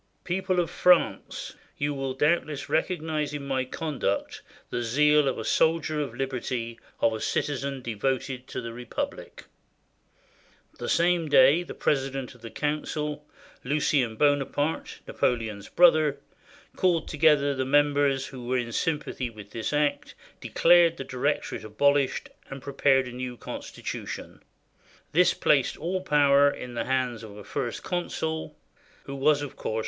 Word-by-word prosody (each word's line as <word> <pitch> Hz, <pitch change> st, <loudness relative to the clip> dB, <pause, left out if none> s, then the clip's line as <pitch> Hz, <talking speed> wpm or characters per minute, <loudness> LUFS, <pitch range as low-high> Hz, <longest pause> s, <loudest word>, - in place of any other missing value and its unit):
"People 185 Hz, 0 st, 0 dB
of 170 Hz, -, 0 dB
France, 180 Hz, -1 st, +2 dB, 0.2 s
you 145 Hz, 0 st, -1 dB
will 135 Hz, -1 st, -3 dB
doubtless 150 Hz, 0 st, 0 dB
recognize 155 Hz, -4 st, -1 dB
in 140 Hz, -1 st, -5 dB
my 135 Hz, -1 st, 0 dB
conduct 130 Hz, -7 st, -3 dB, 0.3 s
the 120 Hz, -, -1 dB
zeal 150 Hz, +5 st, +3 dB
of 130 Hz, -, 0 dB
a 110 Hz, -, -4 dB
soldier 160 Hz, -1 st, +2 dB
of 135 Hz, -5 st, -5 dB
liberty, 125 Hz, -3 st, -3 dB, 0.2 s
of 115 Hz, -, +3 dB
a 110 Hz, -, -4 dB
citizen 140 Hz, -2 st, -2 dB
devoted 130 Hz, +3 st, -2 dB
to -, -, -5 dB
the 115 Hz, 0 st, -6 dB
Republic." 120 Hz, 0 st, -6 dB, 1.3 s
The -, -, -4 dB
same 170 Hz, -2 st, +2 dB
day 140 Hz, +4 st, +6 dB
the 175 Hz, -, -8 dB
president 135 Hz, -2 st, -1 dB
of 125 Hz, -, -19 dB
the 115 Hz, -, -8 dB
council, 150 Hz, +1 st, -3 dB, 0.4 s
Lucien 135 Hz, -4 st, +1 dB
Bona 145 Hz, +2 st, +3 dB
parte, 150 Hz, +3 st, -3 dB
Napoleon's 110 Hz, -5 st, -1 dB
brother, 155 Hz, -4 st, +4 dB, 0.6 s
called 175 Hz, -3 st, +1 dB
together 150 Hz, -2 st, +3 dB
the 130 Hz, -1 st, -1 dB
members 145 Hz, -1 st, +2 dB
who 125 Hz, -3 st, -9 dB
were 130 Hz, +1 st, +1 dB
in 120 Hz, -1 st, -2 dB
sympathy 145 Hz, -2 st, -2 dB
with 105 Hz, -3 st, -12 dB
this 115 Hz, 0 st, -3 dB
act, 150 Hz, -1 st, 0 dB, 0.2 s
declared 170 Hz, -1 st, +4 dB
the -, -, -4 dB
Director 135 Hz, +3 st, -1 dB
ate -, -, -13 dB
abolished, 140 Hz, +6 st, +1 dB, 0.2 s
and 135 Hz, -, -7 dB
prepared 135 Hz, -1 st, +2 dB
a -, -, -7 dB
new 125 Hz, 0 st, -5 dB
constitution. -, -, -7 dB, 0.7 s
This 180 Hz, +3 st, +4 dB
placed 140 Hz, -3 st, +2 dB
all 185 Hz, +4 st, -2 dB
power 145 Hz, -4 st, +5 dB
in 125 Hz, -3 st, -7 dB
the 120 Hz, -, -2 dB
hands 125 Hz, -3 st, -1 dB
of 105 Hz, -2 st, -10 dB
a 105 Hz, -, -9 dB
First 120 Hz, +3 st, -4 dB
Consul 160 Hz, -3 st, -3 dB, 0.2 s
— -, -, -30 dB
who 135 Hz, -, -7 dB
was, 145 Hz, +1 st, +2 dB
of 145 Hz, -, -7 dB
course. 110 Hz, -, -3 dB
140 Hz, 150 wpm, -27 LUFS, 125-150 Hz, 1.3 s, day